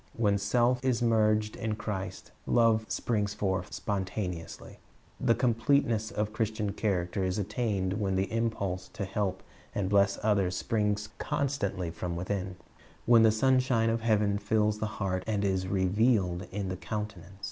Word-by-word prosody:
When 100 -3 +2
self 120 +4 +2
is 125 -3 +1
merged 110 -2 +2
in 110 -1 -2
Christ, 95 -4 -5 0.2
love 115 -2 +3
springs 105 -3 -1
forth 95 -2 -1
spontaneously. 95 -3 -4 0.4
The 115 - +3
completeness 115 -2 +2
of 105 -2 -2
Christian 110 -1 -1
character 95 -3 -1
is 95 +1 -1
attained 105 -2 -1
when 95 -2 0
the 95 +3 -1
impulse 100 -5 -1
to 100 - -3
help 100 0 -2 0.3
and 100 -2 0
bless 100 0 +4
others 100 -4 +2
springs 105 -2 0
constantly 100 -11 -1
from 85 +1 -4
within, 95 +1 -3 0.3
— - - -27
when 120 -1 +7
the 110 - +7
sunshine 125 -1 +3
of 115 0 -1
heaven 105 -3 +2
fills 105 +1 +1
the 110 - -1
heart 95 -2 -1
and 105 -2 0
is 95 -1 0
revealed 95 -1 +1
in 100 -1 -3
the 90 - -3
countenance. 95 0 -6
105 Hz, 150 wpm, -29 LUFS, 95-110 Hz, 0.4 s, when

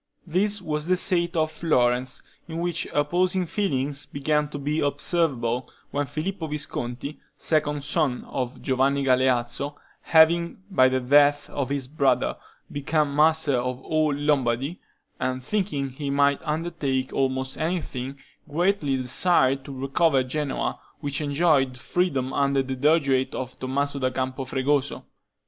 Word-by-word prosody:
This 195 +4 0
was 150 -1 -2
the 185 0 +3
state 175 -1 +2
of 155 -1 +1
Florence, 125 -6 +1 0.2
in 165 -1 -6
which 170 -2 -1
opposing 180 +5 +1
feelings 145 -7 -2
began 150 +1 0
to 150 - -6
be 150 +2 -1
observable, 135 -5 0 0.2
when 145 0 -1
Filippo 160 +4 -3
Visconti, 140 -2 -5 0.2
second 150 -2 0
son 145 -3 0
of 125 -1 -4
Giovanni 135 +1 +2
Galeazzo, 130 +1 +1 0.3
having, 170 +3 +4
by 130 -8 +5
the 130 0 +1
death 145 +3 +4
of 135 -2 -2
his 140 -2 -1
brother, 135 -2 +1 0.4
become 145 0 0
master 155 -1 +3
of 125 +1 -2
all 155 -1 +1
Lombardy, 140 +1 0 0.4
and 130 0 -2
thinking 180 -6 -1
he 140 +2 -5
might 140 0 +2
undertake 150 -5 -2
almost 130 0 -1
anything, 145 -5 -3 0.3
greatly 160 -3 +1
desired 135 +1 +2
to - - -7
recover 135 +1 +2
Genoa, 140 +2 -2 0.2
which 140 -1 -2
enjoyed 145 -3 +2
freedom 135 -3 -1
under 140 -1 +2
the 130 0 -4
Dogiate 140 -2 +2
of 130 -1 -6
Tommaso 140 +2 -1
da 130 -1 +1
Campo 130 +1 -3
Fregoso. 135 +2 0
145 Hz, 135 wpm, -25 LUFS, 130-160 Hz, 0.4 s, by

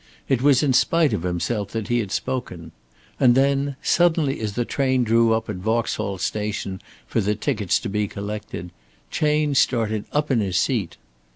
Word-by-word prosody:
It 130 -3 +1
was 140 0 +4
in 140 -3 +2
spite 155 +1 +3
of 105 - -1
himself 90 +4 -2
that 110 -3 -3
he 120 0 +2
had 100 -5 -3
spoken. 90 -8 -4 0.5
And 120 -2 +5
then 140 +1 +2
suddenly 160 -5 +2
as 110 -2 -3
the 120 +3 -1
train 130 -1 +1
drew 115 0 +3
up 110 0 0
at - - -4
Vauxhall 110 -1 -1
Station 100 0 -3 0.2
for - - -1
the 105 +2 0
tickets 105 -2 0
to - - -4
be 105 +1 -1
collected, 100 -3 -6 0.4
Chayne 150 -1 +1
started 110 -5 +1
up 150 0 0
in 125 - +3
his 95 -4 0
seat. 100 -1 0
115 Hz, 175 wpm, -23 LUFS, 100-135 Hz, 0.5 s, And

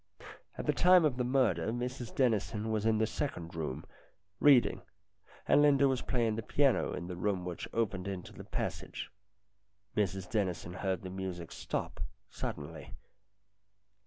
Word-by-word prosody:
At - - -4
the - - +3
time 180 -2 +6
of 135 -5 +1
the 125 - +1
murder 120 -10 +2
Mrs 120 +1 -3
Dennison 110 -3 +1
was 110 0 +1
in 110 -1 +3
the 110 - +3
second 105 - -4
room, 75 -5 -4 0.5
reading, 140 -4 +5 0.7
and - - +6
Linda 140 -1 +5
was 130 -2 +1
playing 115 -4 0
the - - -1
piano 140 +4 +2
in 85 - -4
the 90 0 -5
room 90 0 -1
which 90 -2 -5
opened 100 -5 -1
into 95 -2 -5
the - - -9
passage. - - -4 0.8
Mrs 95 -3 0
Dennison 90 -5 -1
heard 95 0 -2
the 95 - -6
music 95 -3 -5
stop - - -4 0.3
suddenly. 75 0 -6
105 Hz, 150 wpm, -32 LUFS, 90-125 Hz, 0.8 s, time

